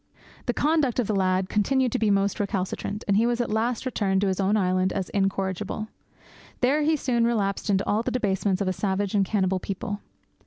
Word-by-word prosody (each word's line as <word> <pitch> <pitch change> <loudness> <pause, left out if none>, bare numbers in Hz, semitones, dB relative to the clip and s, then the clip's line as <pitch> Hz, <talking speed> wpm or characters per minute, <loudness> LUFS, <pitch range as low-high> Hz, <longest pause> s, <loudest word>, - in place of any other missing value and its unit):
The 245 - +2
conduct 295 -4 +1
of 250 - +2
the 215 - -1
lad 185 -1 +1
continued 250 +5 +1
to - - -1
be 215 -1 +2
most 200 0 +1
recalcitrant, 200 +1 -2
and 200 -1 +3
he 230 +2 +3
was 240 0 0
at 240 - -1
last 230 +3 0
returned 195 -6 0
to 200 - +2
his 190 - -2
own 200 +2 +2
island 185 -1 +1
as 190 -2 -3
incorrigible. 195 +2 -2 0.7
There 275 +5 +3
he 310 +1 +3
soon 250 -5 0
relapsed 210 -4 0
into 195 -1 +2
all 210 +2 +1
the 235 - -2
debasements 200 -5 0
of - - -3
a 185 - +1
savage 195 0 -1
and 200 -2 +3
cannibal 190 -1 0
people. 200 +2 -4
205 Hz, 205 wpm, -25 LUFS, 190-235 Hz, 0.7 s, and